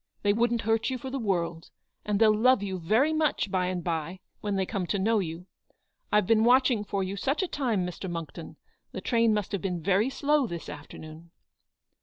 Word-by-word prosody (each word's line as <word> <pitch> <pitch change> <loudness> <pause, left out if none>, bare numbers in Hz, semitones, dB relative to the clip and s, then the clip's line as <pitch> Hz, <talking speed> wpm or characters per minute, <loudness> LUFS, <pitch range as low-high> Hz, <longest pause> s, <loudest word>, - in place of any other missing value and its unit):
They 205 0 +3
wouldn't 235 +1 +1
hurt 225 +2 +1
you 260 - -2
for 260 +1 -7
the 270 - -3
world; 170 -6 -2 0.3
and 210 -1 -1
they'll 215 -1 +5
love 250 0 +4
you 190 -2 -3
very 225 - +2
much 310 -10 0
by 185 -1 +1
and 180 -1 -3
by, 165 +2 -3 0.2
when 205 -1 -2
they 190 -1 0
come 185 -1 -3
to 205 - 0
know 215 +3 +2
you. 170 -1 -5 0.7
I've 210 -2 +3
been 220 +2 +3
watching 250 -2 +4
for 200 -1 -2
you 190 +1 -4
such 275 - -1
a - - -1
time, 235 - -1
Mr. 180 +1 -6
Monckton. 165 -2 -7 0.4
The - - -5
train 230 -2 +2
must 210 -3 -1
have 200 - -2
been 180 -3 -2
very 200 +6 +2
slow 285 -1 +1
this 170 -4 -6
after 145 0 -9
noon 155 +2 -11
205 Hz, 210 wpm, -28 LUFS, 180-235 Hz, 0.7 s, they'll